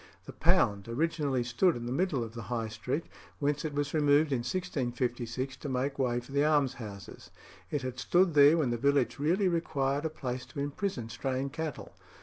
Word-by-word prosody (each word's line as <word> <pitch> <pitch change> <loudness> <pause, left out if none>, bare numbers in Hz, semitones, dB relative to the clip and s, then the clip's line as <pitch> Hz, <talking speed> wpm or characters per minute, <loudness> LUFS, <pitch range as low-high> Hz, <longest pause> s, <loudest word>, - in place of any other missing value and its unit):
The - - -9
Pound 100 0 +2
originally 140 -1 0
stood 125 +9 +2
in 120 - -5
the 120 - -3
middle 145 -3 0
of 110 -1 -8
the 115 - -6
High 115 -2 -1
Street, 125 +8 -3 0.3
whence 145 0 0
it 155 -2 -3
was 145 0 -1
removed 145 0 +4
in 130 - +1
1656 130 -5 -2
to 145 - -6
make 135 +2 -1
way 120 -2 +1
for 125 +2 -12
the 140 +1 +2
almshouses. 125 - -1 0.4
It 145 -4 -2
had 130 0 -4
stood 175 +6 +3
there 145 +2 +7
when 140 -7 +1
the 120 - 0
village 140 +1 +2
really 180 +7 +2
required 145 -4 0
a - - +1
place 130 -4 -4
to 125 - -8
imprison 140 - -3
straying 130 +3 -2
cattle. 160 0 -5
135 Hz, 185 wpm, -30 LUFS, 120-150 Hz, 0.4 s, there